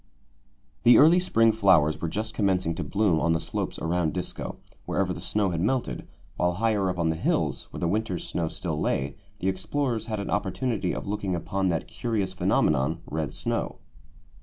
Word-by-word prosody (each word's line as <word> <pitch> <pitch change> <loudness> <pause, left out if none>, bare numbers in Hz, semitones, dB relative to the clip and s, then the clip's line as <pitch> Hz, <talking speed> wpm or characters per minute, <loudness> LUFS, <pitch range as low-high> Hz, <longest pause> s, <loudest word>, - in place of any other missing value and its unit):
The 120 - +7
early 165 +5 +7
spring 115 -11 +4
flowers 95 -8 +3
were 85 - -1
just 110 +5 -3
commencing 95 -5 +1
to - - -4
bloom 100 -6 +2
on 85 +1 +2
the 80 - +1
slopes - - -3
around 85 0 0
Disko, 90 - -4 0.3
wherever - - 0
the - - -7
snow 105 -3 0
had 85 -1 -1
melted, 105 - -1 0.3
while 90 0 +2
higher 105 -1 +1
up 90 - -3
on 85 -2 +1
the 80 - 0
hills, 80 - -1
where - - -8
the 85 - +1
winter's 95 -2 -1
snow 85 -1 -1
still 80 -1 -3
lay, 70 +1 -1 0.3
the - - 0
explorers 110 +4 -1
had 110 -2 -2
an 100 - -4
opportunity 95 -1 -1
of - - -4
looking 100 -2 -2
upon 95 +2 -1
that 80 -2 -1
curious 105 -6 -2
phenomenon, 80 -2 +1
red 75 -2 -3
snow. - - -2
95 Hz, 185 wpm, -26 LUFS, 85-110 Hz, 0.3 s, The